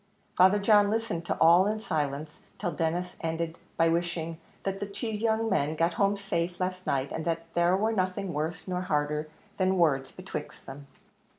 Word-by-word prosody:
Father 190 +3 +6
John 205 0 +5
listened 215 -6 -1
to - - -1
all 170 +4 +6
in 215 +1 -1
silence, 150 -5 -2 0.3
till 175 - -2
Denis 170 +3 -2
ended 165 0 -3 0.2
by 165 - +4
wishing 165 -1 -1 0.2
"that 195 0 -2
the 205 - -3
two 205 +3 -4
young 220 +1 0
men 155 -7 +1
got 165 +2 +1
home 200 0 +2
safe 175 -3 -2
last 185 0 -3
night, 135 0 0
and 160 - -3
that 165 -1 -1
there 175 +2 +3
war 220 +3 +1
nothing 185 -1 -1
worse 160 +4 -3
nor 180 -1 -1
harder 150 -2 -1 0.3
than 190 0 +2
words 135 -6 +2
betwixt 185 -5 -7
them." 140 +1 -10
175 Hz, 180 wpm, -28 LUFS, 160-195 Hz, 0.3 s, Father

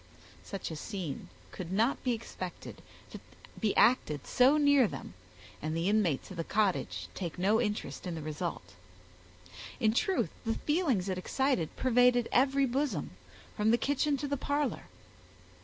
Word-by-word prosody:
Such 195 -4 -5
a - - -4
scene 170 - -5 0.2
could 180 -1 -7
not 225 +8 +1
be 250 - +1
expected 185 -5 -7 0.3
to - - -8 0.4
be 215 -3 0
acted 155 - +3
so 265 +4 +4
near 285 -4 +5
them, - - -8 0.5
and 155 +2 -2
the 165 +2 0
inmates 200 -8 +1
of 185 - -8
the 165 - -1
cottage 140 - 0
take 175 -3 -5
no 205 +6 +3
interest 210 -3 -3
in 175 - -3
the 160 - -5
result. 155 - -5 1.1
In 220 -1 +3
truth, 375 - +1
the 225 -1 -1
feelings 295 - 0
it 185 -1 -2
excited 260 - 0
pervaded 245 -1 +3
every 275 +2 +3
bosom, 255 - -1 0.4
from 210 +1 +2
the 235 - +5
kitchen 285 +2 +1
to 290 - -3
the 285 0 -1
parlor. 285 +1 -1
220 Hz, 155 wpm, -31 LUFS, 180-265 Hz, 1.1 s, near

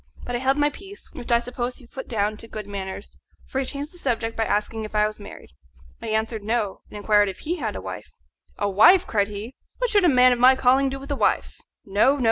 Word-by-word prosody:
But 245 - -3
I - - -1
held 265 +2 +1
my 295 0 +2
peace, 390 +4 -12
which 250 -6 -6
I 235 - +6
suppose 245 +1 -4
he 255 - -15
put 265 +3 -9
down 215 -2 -1
to 230 - -9
good 215 -2 -7
manners, 200 0 -7 0.3
for 265 - -3
he 270 - -1
changed 285 +4 -6
the 355 - -10
subject 230 -5 -1
by 225 - 0
asking 220 +2 -1
if 215 0 -8
I 210 0 +4
was 215 0 -4
married. 200 - -12 0.5
I - - -6
answered, 220 0 -1
No, 215 -2 -1
and - - -9
inquired 205 -1 +3
if 190 - -9
he 345 +4 -2
had 220 - -3
a - - -5
wife. 95 -1 -8 0.5
"A 205 - 0
wife!" 220 - +6
cried 205 -2 +1
he; 210 +4 -7 0.2
"what - - -1
should 410 -2 +4
a 350 - +5
man 255 -2 +6
of 245 - +1
my 255 +2 +7
calling 265 +1 +3
do 270 0 -5
with 275 +2 -8
a - - +1
wife? - - 0 0.3
No, 210 +8 +3
no! - - -6
235 Hz, 255 wpm, -24 LUFS, 210-270 Hz, 0.5 s, my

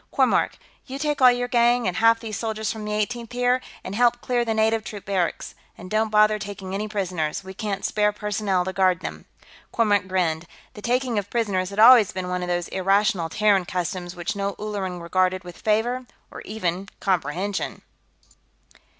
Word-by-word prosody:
Kormork, - - +2 0.3
you 265 - -5
take 295 -1 -1
all 255 - +9
your 245 0 -1
gang, 240 -1 +3
and 180 - -2
half 230 +1 +5
these 225 -2 -6
soldiers 220 -1 -2
from 220 -2 -6
the 210 - -4
Eighteenth, 230 +3 -2
here, 245 +1 +2 0.2
and 185 - -6
help 240 +2 +3
clear 245 -1 0
the 230 - -2
native 220 0 +2
troops 205 -1 -8
barracks. 185 -4 -2 0.2
And 185 +1 -10
don't 220 +1 +1
bother 215 0 +4
taking 200 -2 -7
any 210 +2 -2
prisoners; 185 -5 -2
we 190 0 -9
can't 195 0 -3
spare 210 -1 +2
personnel 205 -3 -1
to 190 - -3
guard 185 -1 +2
them." - - -7 0.5
Kormork 205 -4 +2
grinned. 175 -3 -1 0.3
The 210 - -10
taking 245 -1 0
of 205 0 -7
prisoners 200 -6 0
had 200 - -9
always 225 -2 +8
been 185 -1 -4
one 180 0 -2
of 180 - -4
those 175 0 -1
irrational 190 -2 +1
Terran 200 0 +2
customs 180 0 -4
which 175 +2 -3
no 200 0 -2
Ulleran 200 -4 -4
regarded 185 +2 0
with 175 -1 -11
favor, 240 +4 0 0.2
or - - -9
even 190 -2 -3
comprehension. 185 +1 -2
205 Hz, 185 wpm, -24 LUFS, 185-225 Hz, 0.5 s, all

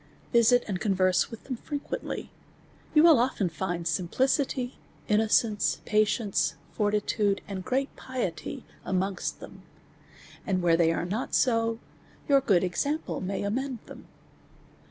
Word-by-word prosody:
Visit 240 +1 +5
and 190 -4 -2
converse 185 -3 +2
with 230 - -10
them 255 -3 -5
frequently; 290 +4 -5 0.6
you 305 - +7
will 330 -6 +7
often 235 -7 +1
find 170 0 -3
simplicity, 250 - 0 0.3
innocence, 215 0 +2
patience, 215 -1 +1 0.2
fortitude, 205 -1 0
and 190 -2 -5
great 270 +5 -1
piety 245 -11 -4 0.2
amongst 190 0 -2
them; - - -11 0.8
and 185 -2 -1
where 170 -1 +5
they 165 -1 +3
are 165 - -1
iiot 210 +8 -2
so, 230 -2 +2 0.5
your 280 -2 +5
good 195 -9 +3
example 285 - -2
may 195 +2 -3
amend 255 +5 -2
them. - - -12
210 Hz, 125 wpm, -28 LUFS, 185-250 Hz, 0.8 s, you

